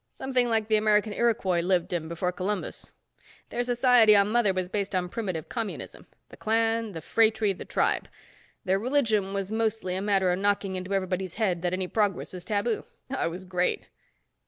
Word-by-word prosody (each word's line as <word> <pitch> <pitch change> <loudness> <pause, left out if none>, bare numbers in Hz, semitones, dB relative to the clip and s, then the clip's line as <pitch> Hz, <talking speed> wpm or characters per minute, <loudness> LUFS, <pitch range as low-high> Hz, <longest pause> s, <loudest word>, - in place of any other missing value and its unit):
Something 255 -2 0
like 220 -2 +1
the 215 -1 +3
American 210 0 +2
Iroquois 200 -6 +1
lived 180 0 0
in 165 -2 -2
before 170 +2 -2
Columbus. 190 +2 -4 0.6
Their 245 - -1
society 245 -3 +5
on 200 +1 +4
Mother 235 -4 +3
was 185 -1 -2
based 200 +1 -2
on 180 -1 -1
primitive 185 -7 -4
communism. 225 -4 -6 0.2
The - - -13
clan, 225 -1 0
the 165 - -6
phratry, 220 -1 +2
the - - -9
tribe. - - 0 0.6
Their 190 +1 +2
religion 220 -5 +1
was 195 0 -3
mostly 220 -4 -1
a 190 - -2
matter 195 -3 +2
of 180 - -1
knocking 200 -1 0
into 185 +2 -3
everybody's 185 -1 -2
head 190 -7 0
that 175 0 -1
any 185 0 -2
progress 205 -2 -1
was 180 -1 -7
taboo. 210 +3 -1 0.3
Oh, - - 0
it - - 0
was 180 +3 -8
great." 180 -1 -1
200 Hz, 180 wpm, -27 LUFS, 185-225 Hz, 0.6 s, society